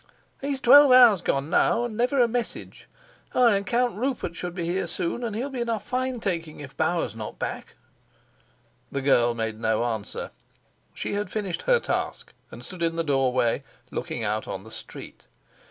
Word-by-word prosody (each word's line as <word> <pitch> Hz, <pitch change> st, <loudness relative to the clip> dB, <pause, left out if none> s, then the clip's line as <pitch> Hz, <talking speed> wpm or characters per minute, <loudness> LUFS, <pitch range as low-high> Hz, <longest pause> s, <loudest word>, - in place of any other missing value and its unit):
"He's 275 Hz, -1 st, -2 dB
twelve 280 Hz, +2 st, +8 dB
hours 240 Hz, -7 st, +7 dB
gone 140 Hz, -1 st, -1 dB
now, 235 Hz, -, +3 dB
and 240 Hz, -3 st, -4 dB
never 250 Hz, +4 st, +1 dB
a 240 Hz, -, +5 dB
message! 240 Hz, 0 st, -5 dB, 0.5 s
Ay, 240 Hz, -4 st, +5 dB
and 200 Hz, -, -5 dB
Count 245 Hz, 0 st, +1 dB
Rupert 245 Hz, -7 st, -3 dB
should 180 Hz, 0 st, -5 dB
be 175 Hz, -3 st, -3 dB
here 180 Hz, +1 st, -1 dB
soon, 175 Hz, +7 st, -3 dB
and 225 Hz, -3 st, -3 dB
he'll 260 Hz, +6 st, -3 dB
be 255 Hz, -2 st, -3 dB
in 235 Hz, -, -2 dB
a 225 Hz, -2 st, 0 dB
fine 255 Hz, +2 st, -2 dB
taking 165 Hz, -7 st, -3 dB
if 140 Hz, -2 st, -10 dB
Bauer's 160 Hz, -, 0 dB
not 110 Hz, -1 st, -7 dB
back." -, -, -5 dB, 1.2 s
The 140 Hz, -1 st, -3 dB
girl 120 Hz, -3 st, +3 dB
made 110 Hz, -1 st, -3 dB
no 110 Hz, 0 st, +1 dB
answer; 110 Hz, -4 st, -4 dB, 0.6 s
she -, -, -3 dB
had 205 Hz, -2 st, -2 dB
finished 200 Hz, -3 st, -3 dB
her -, -, +5 dB
task -, -, -3 dB, 0.2 s
and -, -, -10 dB
stood 185 Hz, -2 st, -9 dB
in 165 Hz, 0 st, +1 dB
the 165 Hz, -, 0 dB
doorway, 130 Hz, -5 st, +1 dB, 0.3 s
looking 115 Hz, -, -4 dB
out 105 Hz, +1 st, -2 dB
on 95 Hz, -, -5 dB
the 110 Hz, -, -13 dB
street. -, -, -7 dB
185 Hz, 185 wpm, -25 LUFS, -, 1.2 s, twelve